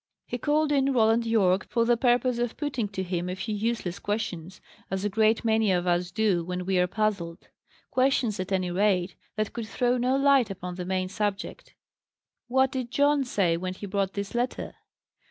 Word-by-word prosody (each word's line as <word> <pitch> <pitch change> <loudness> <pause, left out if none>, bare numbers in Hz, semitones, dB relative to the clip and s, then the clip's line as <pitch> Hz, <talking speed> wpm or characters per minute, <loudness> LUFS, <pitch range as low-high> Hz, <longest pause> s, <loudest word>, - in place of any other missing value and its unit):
He 245 - -4
called 300 +3 +1
in 275 -1 +2
Roland 225 -1 +3
Yorke, 195 -4 +2
for 230 -1 +1
the 240 0 +4
purpose 245 0 +2
of 240 -1 -2
putting 270 -7 -2
to 195 -2 -4
him 180 -1 -3
a 180 - -3
few 215 +3 -4
useless 210 -4 -2
questions 190 -4 -4 0.3
as 190 +1 -2
a - - +1
great 220 +2 +2
many 220 -2 +3
of 180 -1 +1
us 175 0 +1
do 205 -4 +1
when 180 +1 -4
we 190 -1 +1
are 180 - +3
puzzled 190 -5 -2 0.4
questions, 255 -5 +1
at 185 +1 -4
any 185 -2 0
rate, 185 -1 +1 0.2
that 215 -1 -2
could 230 -2 -5
throw 245 +2 +1
no 250 +2 +2
light 275 -4 +4
upon 180 -2 -6
the 180 0 -5
main 185 0 -1
subject. 205 +1 -4 0.7
"What 265 +2 +2
did 255 -2 -3
John 285 +2 +3
say 185 -8 +1
when 185 +1 -4
he 205 - -7
brought 195 -1 -1
this 200 -1 -4
letter?" 240 +1 -2
210 Hz, 190 wpm, -27 LUFS, 185-240 Hz, 0.7 s, the